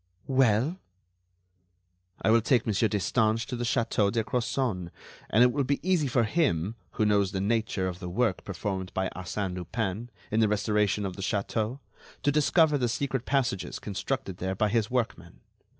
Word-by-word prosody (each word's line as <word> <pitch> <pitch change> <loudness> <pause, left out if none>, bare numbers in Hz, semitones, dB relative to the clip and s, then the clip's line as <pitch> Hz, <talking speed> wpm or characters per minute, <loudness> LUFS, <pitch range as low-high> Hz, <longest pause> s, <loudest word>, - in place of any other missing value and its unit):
"Well?" 130 - +2 1.4
"I 110 - +4
will 115 +1 +5
take 120 0 +2
Monsieur 110 0 +2
Destange 110 +2 +1
to 125 - -4
the 120 - -3
château 115 -4 +1
de 115 -2 0
Crozon, 115 -6 -1 0.4
and 110 +4 +5
it 125 - +5
will 140 +3 0
be 140 +2 0
easy 175 -6 +3
for 120 -2 +2
him, 110 - +1 0.2
who 110 - +1
knows 100 -2 +2
the 95 - -1
nature 105 -2 0
of 90 -1 -5
the 90 -2 -5
work 105 +1 0
performed 95 0 -4
by 95 -1 0
Arsène 95 +1 -3
Lupin 100 +5 -3 0.2
in 110 - +2
the 110 - +4
restoration 105 -1 +1
of 95 -1 -5
the - - -6
Château, 105 +4 -1 0.5
to 145 - +3
discover 150 0 +3
the 120 -2 +1
secret 125 0 -2
passages 125 -9 0
constructed 100 -1 -4
there 95 +1 -2
by 105 +2 +1
his 110 0 +1
workmen. 120 - -3
110 Hz, 170 wpm, -28 LUFS, 100-125 Hz, 1.4 s, will